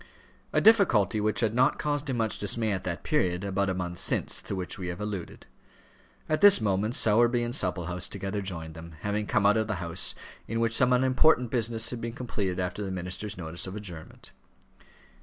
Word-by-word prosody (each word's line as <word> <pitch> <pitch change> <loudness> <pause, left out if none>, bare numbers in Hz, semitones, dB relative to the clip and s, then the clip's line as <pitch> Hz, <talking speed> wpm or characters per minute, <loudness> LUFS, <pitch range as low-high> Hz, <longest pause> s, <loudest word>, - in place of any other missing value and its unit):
A - - +2
difficulty 120 - +4
which 110 +2 0
had 110 -2 +1
not 130 +4 +3
caused 145 -1 -2
him 130 - -1
much 110 -2 0
dismay 110 +2 0
at 95 -2 -2
that - - -4
period, 90 0 0
about 100 0 0
a 95 - -1
month 90 -1 -4
since, - - -1
to - - -5
which 90 0 -5
we 90 - -4
have 90 +1 -5
alluded. 105 -4 -6 0.8
At 155 +3 0
this 205 -1 +8
moment 105 +2 0
Sowerby 120 +2 +4
and 120 0 -3
Supplehouse 90 -5 -1
together 100 +1 -4
joined 85 -4 -5
them, 80 0 -11
having 105 +1 -2
come 105 -4 +1
out 105 +2 +5
of 110 -1 0
the 110 - -1
House, 85 -2 -2 0.3
in 115 +1 -2
which 115 -1 +1
some 125 +1 +4
unimportant 130 0 +3
business 115 -1 0
had 120 -2 -5
been 115 0 -4
completed 100 -7 -3
after 90 +3 -3
the 95 - -4
minister's 95 +3 -5
notice 85 +1 -4
of 95 - -6
adjournment. 90 -7 -9
105 Hz, 195 wpm, -28 LUFS, 90-115 Hz, 0.8 s, this